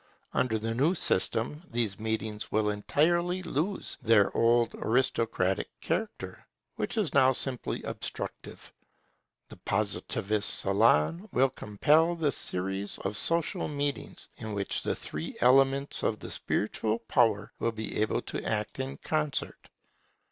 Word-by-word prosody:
Under 115 -3 +1
the 115 +1 -2
new 145 +10 +2
system 115 - -1
these 115 -5 -1
meetings 110 -1 -3
will 105 0 +2
entirely 170 - +1
lose 175 +4 -2
their 110 -3 +4
old 115 0 +3
aristocratic 115 -6 0
character, 195 +7 -4 0.3
which - - -3
is 205 -7 0
now 130 -1 +5
simply 130 -1 +1
obstructive. - - -6 0.8
The - - -12
Positivist 105 +1 -1
salon 105 - +3
will 130 +1 +3
complete 155 - +2
the 150 -3 +2
series 95 -2 -3
of - - -3
social 165 +9 +1
meetings, 145 -1 -3
in 110 -1 -6
which 100 -1 -1
the - - -1
three 75 +2 -6
elements 135 +2 +3
of 110 - 0
the - - -7
spiritual 110 +1 -1
power 115 -3 +1
will 115 - +1
be 110 -1 -4
able 110 - 0
to - - -5
act 105 +4 -2
in 135 +1 -4
concert. 155 -2 -2
115 Hz, 130 wpm, -29 LUFS, 105-145 Hz, 0.8 s, now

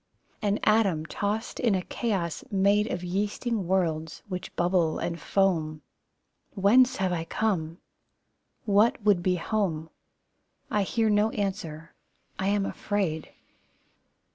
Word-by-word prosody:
An 205 -1 +1
atom 200 -8 +3
tossed 205 +6 -3
in 230 -5 +2
a 185 - -1
chaos 190 -9 -2
made 200 +2 +3
Of 180 - -3
yeasting 205 +3 -2
worlds, 160 -4 -1
which 185 -3 -6
bubble 175 -2 +2
and 170 -1 -3
foam. 160 -6 0 0.7
Whence 245 +6 +5
have 185 -4 0
I 165 -2 -1
come? 165 -3 -1 0.9
What 210 +2 +4
would 205 -4 +4
be 180 +1 +2
home? 170 -4 -2 0.8
I 210 - +2
hear 220 +3 +1
no 210 +1 +3
answer. 180 -7 -4 0.5
I 190 - 0
am 200 0 +2
afraid! 190 -9 -2
195 Hz, 120 wpm, -27 LUFS, 170-210 Hz, 0.9 s, Whence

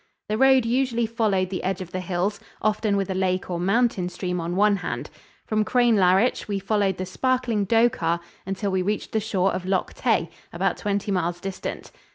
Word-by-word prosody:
The 215 - 0
road 265 -2 +5
usually 240 -1 +1
followed 210 -5 0
the 185 - -3
edge 190 0 -1
of 180 -2 -7
the 185 - -3
hills, 185 +3 -1 0.2
often 215 -1 +1
with 195 -1 -1
a - - 0
lake 185 -1 -1
or 175 - -2
mountain 195 -1 +1
stream 180 -1 -3
on 170 +2 -3
one 205 +1 +4
hand. 180 - -5 0.3
From 215 -1 +1
Crianlarich 220 -3 +3
we 205 -1 -1
followed 195 -1 0
the 185 - -3
sparkling 240 +1 0
Dochart 200 -8 +2 0.2
until 195 +1 -2
we 190 0 +1
reached 205 +3 -2
the 220 - +1
shore 195 -3 0
of 185 - -3
Loch 190 -1 0
Tay, 220 -9 0 0.2
about 180 +2 0
twenty 205 0 -2
miles 175 -2 -1
distant. 190 +1 -6
195 Hz, 190 wpm, -24 LUFS, 185-220 Hz, 0.3 s, road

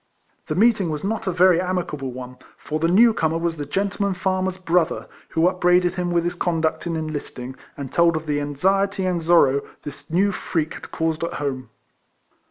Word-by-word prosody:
The - - -2
meeting 210 -3 +3
was 150 -1 -4
not 210 +1 -2
a - - +2
very 180 0 +4
amicable 175 -7 -3
one, 125 0 -8 0.2
for 155 +1 -4
the 165 - +2
new 220 +6 +6
comer 160 -4 0
was 165 -1 -2
the 145 -1 -5
gentleman 200 +3 -1
far 190 0 0
mer's 185 0 -2
brother, 175 -2 0 0.2
who 165 +1 +2
upbraided 180 -1 +3
him 180 -1 -2
with 170 -1 +1
his 175 +1 -1
conduct 165 -2 -1
in 165 - -2
enlisting, 145 -5 -5 0.2
and 140 -2 -6
told 170 -1 +3
of 155 - -6
the 145 -1 -1
anxiety 195 +7 0
and 180 -2 0
sorrow 155 -5 +4 0.2
this 145 -1 -9
new 190 +5 +2
freak 160 -4 -2
had - - -10
caused 160 0 -2
at 170 - -2
home. 130 -4 -4
170 Hz, 190 wpm, -22 LUFS, 155-185 Hz, 0.2 s, new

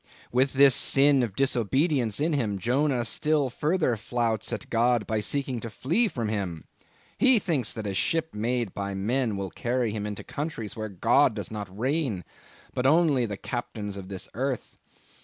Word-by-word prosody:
"With 130 +2 +2
this 140 0 +6
sin 140 +2 +4
of 115 -6 -2
disobedience 130 - +1
in 155 +2 +1
him, 110 -8 0
Jonah 125 +4 +1
still 145 +2 +1
further 155 -2 +1
flouts 115 0 -1
at 110 -5 -5
God, 120 -1 +2
by 110 +1 -1
seeking 130 +3 -1
to 115 - -6
flee 170 - +2
from 120 - -3
Him. 95 -7 -3 0.5
He 260 -2 +6
thinks 160 - 0
that 110 - -5
a 100 - -2
ship 160 +10 0
made 115 0 -1
by 100 0 -4
men 110 +2 0
will 95 -2 -4
carry 120 -1 -1
him 105 -1 -3
into 105 -1 -6
countries 145 -8 -5
where 110 -1 -4
God 115 +6 +3
does 105 -3 -4
not 100 -3 -6
reign, 130 - -1 0.5
but 125 +1 +1
only 145 -5 +3
the 100 -2 -5
Captains 105 -4 -5
of 95 -1 -8
this 95 -1 -6
earth. 130 0 -3
120 Hz, 175 wpm, -27 LUFS, 105-140 Hz, 0.5 s, this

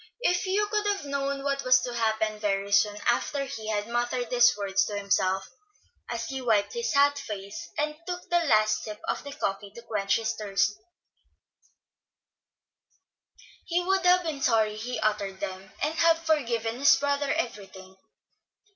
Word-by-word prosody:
If 360 -6 +1
Hugh 405 +3 +2
could 420 -1 0
have 400 -5 -1
known 280 0 -2
what 275 0 -1
was 255 0 +6
to 245 - -4
happen 220 -2 0
very 200 -1 -1
soon 205 0 +3
after 275 +4 +1
he 225 -5 -7
had 210 -1 -1
muttered 240 +1 -2
these 245 -2 +5
words 195 -1 +1
to 205 - -4
himself, 190 -1 0 0.6
as 230 -1 -3
he 265 +2 -5
wiped 220 -5 +1
his 470 -8 -2
hot 285 0 +4
face, 200 -5 -7
and 300 +1 -1
took 360 0 -5
the 345 - +4
last 215 -5 +3
sip 210 -1 -7
of - - -2
the 285 - -7
coffee 200 -5 -3
to 235 - -10
quench 210 -4 0
his 225 -1 -1
thirst, 200 -1 0 2.9
he 345 0 +1
would 380 0 +1
have 360 0 +5
been 310 -4 -4
sorry 220 -4 +2
he 235 +2 -4
uttered 205 -3 -1
them, 190 -1 -6
and 300 +2 +1
have 330 0 +3
forgiven 235 -7 0
his 280 - +6
brother 285 0 0
everything. 195 - -5
235 Hz, 165 wpm, -27 LUFS, 210-285 Hz, 2.9 s, was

